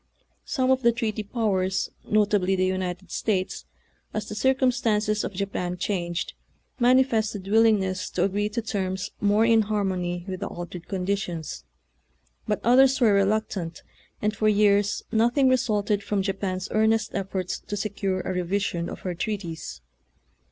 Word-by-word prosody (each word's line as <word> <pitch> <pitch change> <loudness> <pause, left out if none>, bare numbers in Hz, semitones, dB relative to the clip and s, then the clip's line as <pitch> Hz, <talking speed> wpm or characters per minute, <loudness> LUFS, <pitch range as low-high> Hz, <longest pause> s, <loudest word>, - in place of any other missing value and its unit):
Some 260 -3 +1
of 260 0 +3
the 235 -1 +5
treaty 225 -2 -2
powers, 195 -4 -1
notably 205 -3 +2
the 185 0 +2
United 185 -1 -3
States, 190 -4 -1 0.5
as 215 - -2
the - - -5
circum 260 +3 +3
stances 215 -3 0
of - - -3
Japan 180 -2 -3
changed, 175 -3 -2 0.5
manifested 235 -6 +2
willingness 205 -4 +3
to - - 0
agree 205 +2 0
to 220 +2 -3
terms 190 -3 -2
more 210 +2 +4
in 225 -1 +5
har 210 -1 0
mony 175 -2 -2
with 185 -1 -4
the - - -3
altered 175 0 -8
conditions, 180 - -3 0.8
but 210 - 0
others 260 +2 +5
were 225 -5 +5
reluctant, 200 -4 0 0.4
and 210 +1 +1
for 215 +1 +2
years 205 -1 +3
no 225 +1 +4
thing 265 +2 +3
resulted 210 -5 +1
from 200 -1 -1
Japan's 190 -1 -2
earnest 220 0 +2
efforts 190 -2 -3
to 205 - -5
secure 195 -2 -2
a 185 - -3
revision 180 -1 -1
of - - -8
her 180 - -3
treaties. 175 - -5
205 Hz, 150 wpm, -25 LUFS, 185-220 Hz, 0.8 s, the